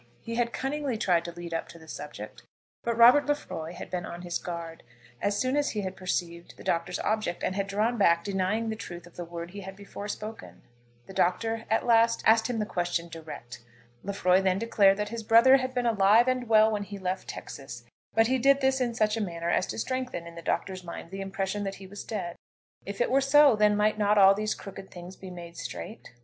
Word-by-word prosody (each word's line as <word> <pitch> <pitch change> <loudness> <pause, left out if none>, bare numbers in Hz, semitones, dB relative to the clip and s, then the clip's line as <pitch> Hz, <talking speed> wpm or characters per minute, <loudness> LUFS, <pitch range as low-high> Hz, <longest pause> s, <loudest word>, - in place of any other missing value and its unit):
He 230 - -7
had 235 0 0
cunningly 270 -2 -2
tried 175 -5 +2
to 170 - -5
lead 170 0 -8
up 165 - -2
to - - -12
the 160 -1 -15
subject, 145 -9 -8 0.4
but 235 -1 -1
Robert 245 +6 +7
Lefroy 175 - -3
had - - -9
been 180 -1 -2
on 175 +1 -7
his 175 -1 -2
guard 170 -2 -6 0.4
as 205 0 0
soon 255 +4 0
as 290 0 +1
he 210 - -2
had 190 -1 -4
perceived 175 -2 -4
the - - -12
Doctor's 170 +1 -1
object, 215 -5 -1
and 185 - -1
had 200 0 -1
drawn 215 +4 0
back, 170 -3 +4
denying 200 +4 -1
the 220 - -2
truth 175 -5 -8
of 175 - -17
the 175 - -5
word 170 0 -7
he 200 +1 -8
had 190 0 -8
before 200 0 -8
spoken. 215 +1 -7 0.4
The - - -11
Doctor 225 +6 0
at 225 - +1
last 230 -1 +4
asked 225 0 +5
him 245 - -1
the 210 - 0
question 175 -2 -2
direct. 155 -8 -9 0.4
Lefroy 190 -2 +2
then 190 -1 +2
declared 200 -3 +4
that 210 0 -2
his 230 +1 -5
brother 230 +5 +6
had 255 -1 -3
been 250 -1 -1
alive 220 +1 +5
and 255 -2 0
well 220 0 +6
when 210 -1 -1
he 200 0 -7
left 185 0 -3
Texas, 135 -3 -8 0.3
but 225 0 +5
he 260 +3 +1
did 275 +2 +5
this 265 -1 +2
in 240 -2 0
such 215 -1 +2
a 225 - -2
manner 170 -3 -2
as - - +1
to - - -5
strengthen 255 -7 -3
in 170 - -10
the 170 - -9
Doctor's 185 +2 -2
mind 170 -1 -8
the 195 0 -5
impression 195 +1 -3
that 195 -1 -3
he 195 - -11
was 200 +2 -8
dead. 180 -6 -4 0.5
If 200 +3 -4
it 240 - +1
were 270 +1 +4
so, 280 -1 +6
then 210 -1 +3
might 215 +1 +2
not 210 0 +3
all 195 -1 +8
these 215 +1 -1
crooked 195 -1 -10
things 180 +1 -10
be 190 - -10
made 170 -1 -10
straight? 225 - -7
200 Hz, 230 wpm, -28 LUFS, 175-230 Hz, 0.5 s, all